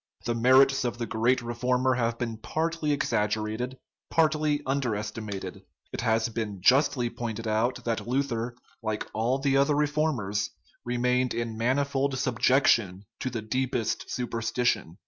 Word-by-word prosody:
The 120 - +1
merits 130 +3 +5
of 120 -1 -2
the 120 - -2
great 120 +3 +1
re 120 0 -4
former 125 +2 +1
have 115 -1 0
been 115 -2 -3
partly 160 +4 -1
exaggerated, 110 -1 -1 0.3
partly 155 -2 +2
underesti 110 -6 -2
mated. 100 -2 -6 0.3
It - - -3
has 115 -1 +2
been 110 -3 -4
justly 130 +3 +4
pointed 115 -1 -4
out 110 +4 0
that 115 -1 -2
Luther, 120 -2 -1 0.3
like 110 -2 -2
all 115 +4 +1
the 135 0 +2
other 140 +2 +3
reformers, 145 -9 0 0.3
remained 125 0 +1
in 115 -1 -2
manifold 135 +3 0
subjection 120 -6 +2
to 130 - -2
the 115 -3 -4
deepest 125 0 -1
superstition. 115 -6 -1
120 Hz, 140 wpm, -27 LUFS, 110-135 Hz, 0.3 s, merits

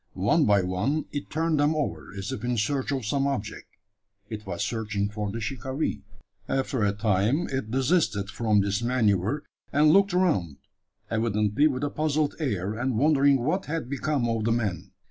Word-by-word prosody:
One - - +2
by 100 -2 +4
one 105 +13 -1
it 145 - -5
turned 160 -1 0
them 145 +2 +3
over, 90 - -3
as 95 0 -4
if 105 - -5
in 120 0 0
search 130 +6 0
of 135 -5 -2
some 140 +6 +1
object. 130 -7 -4 0.6
It 105 -1 -6
was - - -2
searching 105 -3 -2
for 105 -1 -3
the 115 - -4
shikaree. 130 +6 -3 0.5
After 130 -3 0
a 100 - +3
time 105 - +1
it 130 -5 -2
desisted 130 - +1
from 110 -3 +2
this 100 +2 -1
manoeuvre, 120 +1 +1 0.3
and 150 +2 +5
looked 195 -1 +4
around 125 - +1 0.5
evidently 110 +4 +2
with 135 -2 -2
a 145 - -1
puzzled 155 -1 0
air, 105 - -1
and 120 +1 -1
wondering 140 -1 +4
what 180 +8 0
had 150 -4 -3
become 140 -2 0
of 115 -2 -1
the 115 - +2
man. 100 -6 -1
120 Hz, 175 wpm, -26 LUFS, 105-145 Hz, 0.6 s, and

